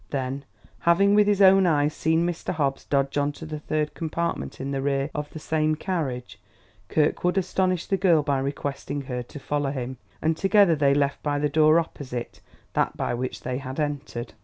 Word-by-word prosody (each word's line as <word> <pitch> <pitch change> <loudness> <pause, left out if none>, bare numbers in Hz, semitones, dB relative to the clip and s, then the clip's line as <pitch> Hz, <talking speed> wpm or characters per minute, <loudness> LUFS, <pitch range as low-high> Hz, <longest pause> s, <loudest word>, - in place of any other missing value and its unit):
Then, 135 +1 -3 0.3
having 195 +4 +4
with 210 0 +5
his 205 -1 +4
own 190 -1 +7
eyes 150 -2 +2
seen 160 +1 +1
Mr. 175 +1 -3
Hobbs 140 -3 -1
dodge 140 -1 0
into 145 +2 -1
the 155 -1 -5
third 150 0 -2
compartment 170 +1 -3
in 135 +1 -4
the 135 -1 -1
rear 140 +1 0
of 150 -1 -4
the - - -9
same 155 0 0
carriage, 150 -9 -3 0.5
Kirkwood 175 +4 +1
astonished 185 -1 0
the 195 - +3
girl 170 -5 +4
by 140 -2 +1
requesting 140 +1 -3
her 125 -2 -4
to 120 - -10
follow 145 0 -1
him; 130 -1 -4 0.2
and 160 +1 +1
together 195 -1 +4
they 140 -2 +3
left 140 -1 0
by 145 -1 -1
the 150 0 +1
door 155 +2 +5
opposite 130 -7 -6 0.3
that - - 0
by - - -1
which 125 +1 -4
they 130 0 -3
had 130 +1 -6
entered. 145 -5 -3
150 Hz, 185 wpm, -25 LUFS, 140-165 Hz, 0.5 s, own